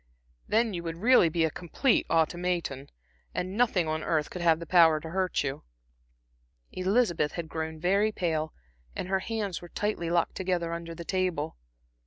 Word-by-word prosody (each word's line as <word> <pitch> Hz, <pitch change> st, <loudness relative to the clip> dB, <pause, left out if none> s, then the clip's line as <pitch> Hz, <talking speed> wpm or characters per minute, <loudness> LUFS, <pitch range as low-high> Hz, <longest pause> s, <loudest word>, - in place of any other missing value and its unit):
Then 225 Hz, 0 st, +2 dB
you 175 Hz, -, -3 dB
would 165 Hz, -1 st, -4 dB
really 210 Hz, -1 st, +5 dB
be 160 Hz, 0 st, +1 dB
a 160 Hz, -, -1 dB
complete 200 Hz, -, +1 dB
automaton, 165 Hz, -4 st, 0 dB, 0.5 s
and 185 Hz, +2 st, -3 dB
nothing 210 Hz, -8 st, +2 dB
on 155 Hz, 0 st, -1 dB
earth 155 Hz, -1 st, 0 dB
could 180 Hz, -, -5 dB
have 165 Hz, -2 st, +4 dB
power 165 Hz, -3 st, +6 dB
to 160 Hz, +1 st, -8 dB
hurt 185 Hz, -2 st, 0 dB
you." 140 Hz, +1 st, -4 dB, 1.1 s
Elizabeth 185 Hz, -5 st, +1 dB
had 170 Hz, -2 st, -4 dB
grown 160 Hz, 0 st, -4 dB
very 200 Hz, +5 st, +2 dB
pale, 160 Hz, -5 st, -1 dB, 0.4 s
and 180 Hz, -, -4 dB
her 190 Hz, 0 st, +2 dB
hands 210 Hz, -3 st, -3 dB
were 175 Hz, -, -10 dB
tightly 205 Hz, -5 st, -2 dB
locked 170 Hz, -1 st, +1 dB
together 180 Hz, -3 st, -1 dB
under 170 Hz, 0 st, -6 dB
the 170 Hz, -, -8 dB
table. 180 Hz, -5 st, -1 dB
170 Hz, 165 wpm, -28 LUFS, 160-190 Hz, 1.1 s, power